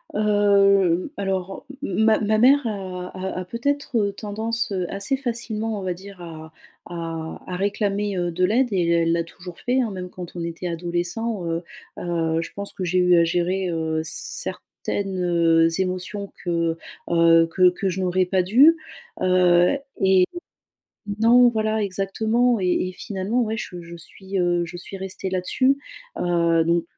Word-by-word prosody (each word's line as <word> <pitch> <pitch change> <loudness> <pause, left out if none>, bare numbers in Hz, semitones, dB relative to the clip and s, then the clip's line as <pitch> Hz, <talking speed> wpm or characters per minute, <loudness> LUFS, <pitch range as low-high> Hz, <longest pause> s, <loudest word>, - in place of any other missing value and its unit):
Hem, 200 -3 +3
alors 195 +3 -3 0.2
m - - -2
m - - +4
ma 220 -1 +5
ma 215 0 +1
mère 265 +3 +5
a 185 -4 -4
a 185 0 -4
a - - -7
peut-être, 275 +7 -2
heu, 200 -1 +1
tendance, 220 +2 -3
heu, 180 -2 -1
assez 200 +8 -1
facilement, 225 -4 -3
on - - -6
va 185 -1 -1
dire 195 +1 -12
à 160 -2 -9 0.4
à 165 -2 -5
à 180 - -5
réclamer, 200 +1 -1
heu, 175 -1 -1
de 180 +2 -1
l'aide 240 +7 +3
et 175 -3 +1
elle 170 -1 +3
l'a 170 0 +1
toujours 175 +1 -11
fait, 255 +1 +1
hein, 230 - -2
même 180 -1 -6
quand 180 -1 -9
on 170 - -4
était 170 +1 -5
adolescents, 175 +5 -2
heu 165 +1 -2 0.4
heu, 165 -2 -1
je 170 - -6
pense 200 0 -5
que 185 - -5
j'ai 180 +1 0
eu 180 -1 +5
à - - +5
gérer, 180 +3 0
heu, 160 -1 -1
certaines, 190 +4 -4
heu, 165 -2 +4
émotions 185 +2 -3
que, 170 -2 0 0.4
heu, 165 -1 +5
que 185 +1 +5
que 185 +2 -3
je 185 +1 -3
n'aurais 185 0 +1
pas 185 +1 +1
dû. 265 - +6 0.4
Heu, 180 +4 +4 0.2
et 190 -1 +5 0.9
non 245 +2 +6
voilà 220 -1 0
exactement 220 +5 +1
et 185 - 0 0.2
et - - -7
finalement 205 +5 -2
ouais 220 -1 -2
je 180 -5 -6
je 170 0 -10
suis, 190 +3 -7
heu, 175 -1 +1
je 175 +1 -8
suis 185 +2 -8
restée 190 0 -5
là-dessus, 225 +9 +1 0.4
heu, 170 -2 +2
donc 170 0 +1
185 Hz, 170 wpm, -23 LUFS, 175-210 Hz, 0.9 s, dû